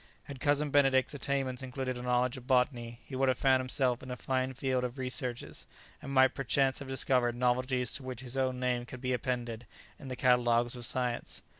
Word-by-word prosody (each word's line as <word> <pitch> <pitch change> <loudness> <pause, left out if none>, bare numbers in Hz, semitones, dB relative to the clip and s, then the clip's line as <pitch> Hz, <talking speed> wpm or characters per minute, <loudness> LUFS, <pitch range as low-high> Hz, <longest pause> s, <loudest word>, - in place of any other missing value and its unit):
Had 140 -2 -9
Cousin 145 +2 +1
Benedict's 135 -2 +3
attainments 135 -3 -2
included 130 0 -3
a 125 - -6
knowledge 125 +1 +1
of 130 -1 -10
botany 120 -2 +1
he 135 - -7
would 135 +1 +2
have 130 - +1
found 130 -1 +4
himself 130 -1 0
in 130 - -9
a 125 - -3
fine 130 0 -2
field 130 -1 0
for 125 - -1
researches, 125 -1 -4 0.3
and 135 - -7
might 130 -1 +5
perchance 135 0 +1
have 140 - -8
discovered 130 -2 +2
novelties 125 0 +1
to 140 - -3
which 130 -1 -6
his 125 -1 -5
own 130 -1 0
name 125 -1 -1
could 130 - -8
be 130 -1 0
appended 120 -2 -3 0.3
in 140 - -10
the 130 - -4
catalogues 120 -1 +3
of 120 -2 -2
science. 125 -2 -2
130 Hz, 200 wpm, -31 LUFS, 125-130 Hz, 0.3 s, might